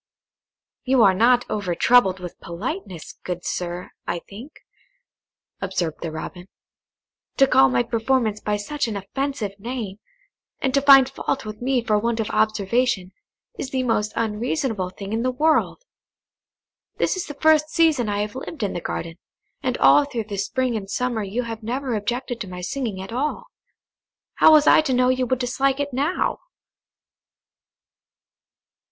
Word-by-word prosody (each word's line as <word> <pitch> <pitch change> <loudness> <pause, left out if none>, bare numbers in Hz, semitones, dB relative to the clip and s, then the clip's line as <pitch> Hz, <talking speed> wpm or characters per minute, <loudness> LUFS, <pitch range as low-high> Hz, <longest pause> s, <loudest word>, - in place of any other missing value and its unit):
"You 260 -3 +4
are 195 -2 +6
not 240 +5 +4
over 195 -5 -2
troubled 195 -2 +4
with 180 -2 -8
politeness, 185 - -6
good 175 -1 -5
sir, 175 0 -4 0.2
I 175 - -1
think," 235 +10 -11 1.1
observed 185 -4 -2
the 165 - -3
Robin; 175 +3 -7 0.9
"to 275 - +7
call 135 - +5
my 125 -1 +2
performance 225 - 0
by 210 -1 -1
such 275 +6 -3
an 215 -3 -3
offensive 210 0 -4
name, 220 -3 -5 0.6
and 265 -1 -1
to 275 - +3
find 270 -2 +8
fault 270 -1 -3
with 215 +1 -8
me 255 -1 +1
for 215 -3 +2
want 230 +1 -1
of 220 - -2
observation, 215 -1 +1 0.5
is 260 - -4
the 260 -1 -1
most 220 -3 0
unreasonable 225 - -1
thing 195 +2 -7
in 225 - 0
the 255 - +1
world. 310 - +1 1.1
This - - +1
is 370 - -4
the 295 - -7
first 310 0 +3
season 315 -9 +2
I 205 0 0
have 210 0 -3
lived 265 +1 -6
in 200 - -1
the 175 - -4
garden, 165 +1 -5 0.4
and - - -1
all 290 - +6
through 245 -5 -4
the 205 -1 -6
spring 250 +5 -1
and 195 -3 -5
summer 250 0 -1
you 210 +5 -2
have 225 -1 -6
never 250 +3 -3
objected 240 +3 -3
to 205 - -4
my 180 0 -7
singing 215 +1 -3
at 210 - -9
all. 280 +5 -2 0.9
How - - +7
was 300 -1 +6
I - - +7
to 290 -4 -1
know 250 0 +3
you 255 0 +1
would 255 - +1
dislike 265 +2 0
it 285 -1 -2
now?" 290 +8 0
230 Hz, 160 wpm, -23 LUFS, 200-265 Hz, 1.1 s, find